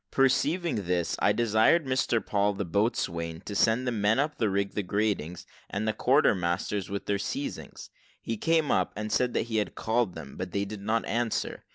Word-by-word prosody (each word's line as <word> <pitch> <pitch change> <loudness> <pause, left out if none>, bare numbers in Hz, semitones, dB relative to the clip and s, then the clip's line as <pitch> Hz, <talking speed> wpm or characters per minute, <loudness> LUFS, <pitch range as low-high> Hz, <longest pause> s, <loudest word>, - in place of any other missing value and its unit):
Perceiving 145 - +1
this, 90 -1 0
I - - +4
desired 115 +8 +3
Mr 130 -4 0
Paul, 100 0 +1
the 100 - -3
boatswain, 85 -4 -1
to 105 - -7
send 115 +4 +2
the 125 - 0
men 105 -1 +2
up 150 +2 0
to 110 - +2
rig 100 0 0
the 105 - -2
gratings, 100 -4 -2 0.2
and 105 +2 -2
the 110 - +1
quarter 135 +4 +4
masters 90 +2 -2
with 100 0 -4
their 100 -1 0
seizings. 135 +8 -5 0.3
He 115 - -3
came 160 +4 +1
up, - - +1
and 105 0 -4
said 125 -1 +1
that - - +2
he 110 -1 -3
had 105 - -1
called 110 -4 0
them, 75 -4 -9
but 90 - -3
that 90 - -19
they 100 0 0
did 100 0 -7
not 110 +3 0
answer. 115 0 -2
105 Hz, 205 wpm, -28 LUFS, 100-120 Hz, 0.3 s, I